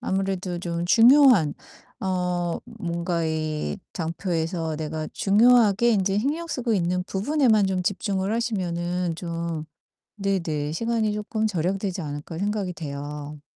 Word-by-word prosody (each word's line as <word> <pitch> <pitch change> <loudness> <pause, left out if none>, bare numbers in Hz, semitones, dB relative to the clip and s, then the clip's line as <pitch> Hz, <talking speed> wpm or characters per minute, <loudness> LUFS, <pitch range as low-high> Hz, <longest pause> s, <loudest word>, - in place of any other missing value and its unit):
아무래도 190 -2 -2
좀 170 -1 -3
중요한 230 - +6 0.5
어 180 -2 -1 0.2
뭔가 170 -1 -2
이 155 +2 -2 0.2
장표에서 165 -1 -2
내가 155 0 -4
중요하게 225 +1 +4
인제 195 -2 +2
신경 310 +7 -1
쓰고 250 -7 -2
있는 180 0 0
부분에만 215 +1 +2
좀 185 -1 -1
집중을 195 +1 -1
하시면은 180 -6 -1
좀 170 -2 -4 0.5
네네 165 -7 -1
시간이 225 +1 0
쪼끔 215 +1 -1
절약되지 190 0 -1
않을까 150 +2 -6
생각이 200 -2 -1
돼요. 145 -1 -6
180 Hz, 275 characters per minute, -25 LUFS, 165-210 Hz, 0.5 s, 중요한